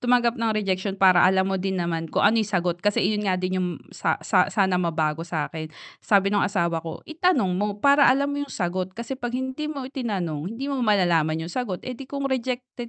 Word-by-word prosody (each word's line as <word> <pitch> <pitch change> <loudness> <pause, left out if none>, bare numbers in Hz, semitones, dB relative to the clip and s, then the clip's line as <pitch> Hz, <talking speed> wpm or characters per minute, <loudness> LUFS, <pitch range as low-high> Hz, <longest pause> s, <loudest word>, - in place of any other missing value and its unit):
tumanggap 245 -1 +2
ng 225 -1 0
rejection 195 -1 -1
para 185 -2 +5
alam 190 0 +3
mo 190 0 -1
din 190 0 -1
naman 165 -2 -2
kung - - 0
ano 225 +1 +5
yung 215 - -2
sagot. 175 -3 -1
Kasi 205 0 +1
iyon 210 0 0
nga 185 - +2
din 185 0 -1
yung 180 - 0 0.2
sa - - 0
sa - - +3
sana 190 -4 +1
mabago 160 -2 0
sa'kin. 155 -1 -4 0.3
Sabi 200 -1 +2
nung 205 - +3
asawa 170 -4 0
ko, 165 -1 -8
itanong 310 - +1
mo, 205 0 -1
para 280 0 +6
alam 280 +2 +2
mo 285 - -2
yung - - -16
sagot. 185 0 -3
Kasi 235 +3 -4
'pag 240 -1 -4
hindi 260 +4 -3
mo 280 -4 -5
itinanong, 200 - -3
hindi 265 - -5
mo 275 - -1
malalaman 170 -7 +2
yung 170 - -7
sagot. 225 -8 -3
Eh, 255 - -4
di 270 - -8
kung 280 0 -4
rejected 250 -1 -3
200 Hz, 220 wpm, -24 LUFS, 180-250 Hz, 0.3 s, para